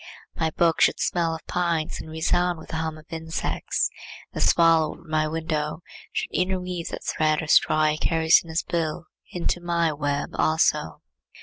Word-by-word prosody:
My 160 -1 0
book 165 +1 +1
should - - +4
smell 165 -2 0
of 160 - -11
pines 170 -3 -1
and 160 - -10
resound 175 +2 +1
with 160 - -12
the 160 - -3
hum 160 -1 -3
of 155 - -15
insects. 160 0 -2 0.5
The - - -3
swallow 165 -2 +4
over 170 - -18
my 155 0 +1
window 155 0 -3 0.3
should - - -3
interweave 180 -2 -2
that - - -6
thread 155 -1 +1
or - - -3
straw 155 +1 +4
he 155 0 -2
carries 160 +1 +4
in 170 - -14
his 160 +1 -1
bill 165 0 -2 0.3
into 175 0 -2
my 170 -2 +1
web 145 -1 -2
also. 160 +1 +1
160 Hz, 175 wpm, -25 LUFS, 155-170 Hz, 0.5 s, should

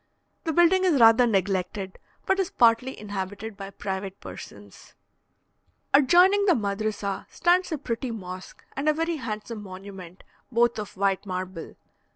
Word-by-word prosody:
The 325 - 0
building 345 +3 +4
is 340 -7 +3
rather 230 +1 +7
neglected, 190 -1 -1 0.3
but 385 0 +1
is 380 - 0
partly 235 +2 +2
inhabited 205 +1 -5
by 195 -1 -8
private 195 -1 -5
persons. - - -12 1.0
Adjoining 355 +9 +5
the 360 - +5
madrissa 205 -1 -3
stands 360 +1 +2
a 315 - -1
pretty 255 -2 -4
mosque 185 -4 -8
and 280 +3 0
a - - +4
very 330 +1 -1
handsome 220 -3 -5
monument, 190 -2 -10 0.3
both 235 -1 +2
of 210 -2 -7
white 195 0 0
marble. 185 -2 -5
215 Hz, 140 wpm, -26 LUFS, 195-285 Hz, 1.0 s, rather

